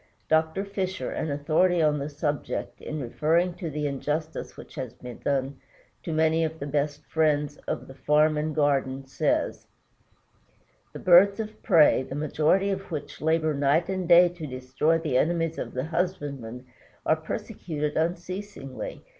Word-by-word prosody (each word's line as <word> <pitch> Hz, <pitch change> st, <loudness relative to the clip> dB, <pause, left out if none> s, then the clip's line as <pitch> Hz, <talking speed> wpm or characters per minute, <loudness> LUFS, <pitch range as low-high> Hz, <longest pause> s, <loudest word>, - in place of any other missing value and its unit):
Dr. 160 Hz, +5 st, +2 dB
Fisher, 190 Hz, -2 st, -3 dB
an 160 Hz, -, -2 dB
authority 160 Hz, +5 st, +2 dB
on 150 Hz, -2 st, +3 dB
the 140 Hz, +2 st, -3 dB
subject, 145 Hz, 0 st, -3 dB
in 155 Hz, -, -5 dB
referring 160 Hz, +7 st, +1 dB
to 170 Hz, -, -4 dB
the 150 Hz, 0 st, -3 dB
injustice 150 Hz, +3 st, -3 dB
which -, -, -11 dB
has 130 Hz, -5 st, -6 dB
been 125 Hz, -1 st, -9 dB
done 135 Hz, -1 st, -1 dB, 0.4 s
to 170 Hz, -, -5 dB
many 160 Hz, +1 st, +2 dB
of 160 Hz, 0 st, -2 dB
the 140 Hz, -, -5 dB
best 145 Hz, +1 st, -2 dB
friends 150 Hz, -2 st, +1 dB
of -, -, -3 dB
the 135 Hz, -, -10 dB
farm 150 Hz, +3 st, +3 dB
and 150 Hz, 0 st, -2 dB
garden, 135 Hz, -3 st, +1 dB
says: 135 Hz, -, -1 dB, 1.2 s
"The -, -, -8 dB
birds 190 Hz, +4 st, +6 dB
of 215 Hz, 0 st, -6 dB
prey, 165 Hz, -, +5 dB
the 130 Hz, +1 st, -6 dB
majority 155 Hz, +6 st, +2 dB
of 195 Hz, 0 st, -4 dB
which 155 Hz, -4 st, -6 dB
labor 160 Hz, 0 st, +2 dB
night 145 Hz, +5 st, +2 dB
and 185 Hz, -2 st, -2 dB
day 175 Hz, +1 st, +8 dB
to 170 Hz, -3 st, -7 dB
destroy 130 Hz, +5 st, 0 dB
the 150 Hz, -6 st, +1 dB
enemies 165 Hz, 0 st, 0 dB
of -, -, -5 dB
the 130 Hz, +2 st, -1 dB
husbandman, 145 Hz, -8 st, -3 dB, 0.4 s
are 155 Hz, -, +4 dB
persecuted 160 Hz, -4 st, -4 dB
unceasingly. 175 Hz, -3 st, -4 dB
155 Hz, 155 wpm, -26 LUFS, 145-170 Hz, 1.2 s, day